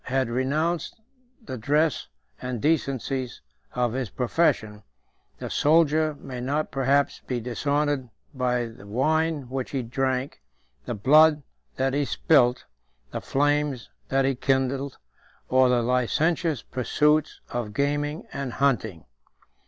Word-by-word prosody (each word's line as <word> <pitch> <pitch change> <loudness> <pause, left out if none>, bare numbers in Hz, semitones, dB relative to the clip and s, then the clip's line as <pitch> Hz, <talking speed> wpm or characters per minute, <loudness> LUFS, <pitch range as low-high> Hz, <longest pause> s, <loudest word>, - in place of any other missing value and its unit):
had 130 -1 0
renounced 150 - -1 0.5
the 130 - -6
dress 150 +4 +1 0.3
and 125 -2 -3
decencies 135 -3 -1 0.4
of 120 -2 0
his 130 -4 -2
profession, 115 - 0 0.6
the - - -6
soldier 155 0 +3
may 130 -3 -7
not 145 +5 -1
perhaps 140 +1 +1
be 125 -2 -1
dishonored 140 +2 -1 0.2
by 125 -2 0
the 115 -3 -11
wine 155 +5 0
which 130 0 -4
he 135 -3 -2
drank, 130 +2 -2 0.4
the 120 - -3
blood 150 +7 +5 0.3
that 130 0 0
he 145 +1 +1
spilt, 130 -3 +2 0.5
the - - -4
flames 145 -6 0 0.2
that 135 0 +2
he 135 - +2
kindled, 135 +1 -1 0.5
or 130 0 +5
the 120 -1 +2
licentious 145 +5 +1
pursuits 150 +5 +1
of 120 -3 -3
gaming 145 +5 -1
and 135 -3 -4
hunting. 110 - 0
135 Hz, 120 wpm, -25 LUFS, 125-150 Hz, 0.6 s, blood